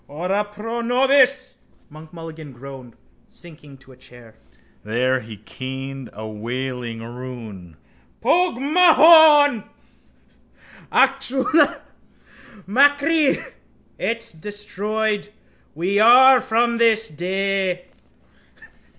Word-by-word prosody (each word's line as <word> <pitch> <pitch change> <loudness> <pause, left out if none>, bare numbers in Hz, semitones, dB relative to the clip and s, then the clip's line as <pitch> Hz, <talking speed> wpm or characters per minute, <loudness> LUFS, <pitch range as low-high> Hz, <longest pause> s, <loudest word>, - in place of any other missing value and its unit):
—Ora 180 +8 -2
pro 210 +3 -7
nobis, 260 +1 +1 0.3
Monk 155 +1 -14
Mulligan 160 -4 -11
groaned, 130 -1 -12 0.3
sinking 150 -5 -15
to 130 0 -19
a - - -16
chair. 120 -3 -17 0.5
There 125 +4 -1
he 110 -2 -11
keened 130 +3 -8
a 110 +1 -9
wailing 120 +1 -6
rune. 115 -8 -10 0.4
—Pogue 340 +3 +1
mahone! 305 - +5 1.3
Acushla 270 +3 +1 0.8
machree! 285 - +2 0.6
It's 230 0 -3
destroyed 210 +3 -4 0.4
we 185 +6 -1
are 250 +3 +6
from 235 +1 0
this 225 -1 +3
day! 185 +2 -3
195 Hz, 85 wpm, -20 LUFS, -, 1.3 s, are